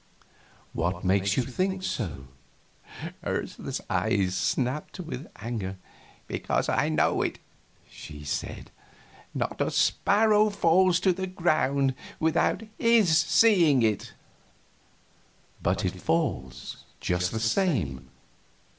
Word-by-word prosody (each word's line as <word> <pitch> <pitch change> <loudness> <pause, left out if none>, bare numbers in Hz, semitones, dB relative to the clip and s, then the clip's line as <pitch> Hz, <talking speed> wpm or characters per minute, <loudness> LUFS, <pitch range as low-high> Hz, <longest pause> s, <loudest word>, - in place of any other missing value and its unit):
"What 90 +1 -2
makes 100 +1 +2
you 130 - +3
think 185 +9 -2
so?" 65 - -3 1.0
Ursula's - - -3
eyes 95 -2 +1
snapped 130 - -1
with 160 -5 -6
anger. 105 -4 -5 0.5
"Because - - -1
I - - +2
know 75 -1 +2
it!" - - -1 0.5
she 75 -1 -10
said. 75 - -4 0.6
"Not - - -2
a - - +1
sparrow 215 +1 +3
falls 185 -2 +3
to 190 -1 +3
the 190 +1 -4
ground 145 -7 +1 0.3
without 160 +6 +1 0.2
His 225 -8 +4
seeing 160 - +5
it." 110 -2 0 1.5
"But - - 0
it - - -3
falls, 65 -6 -2 0.2
just 90 0 0
the 110 - -2
same. 110 - 0
135 Hz, 105 wpm, -27 LUFS, -, 1.5 s, seeing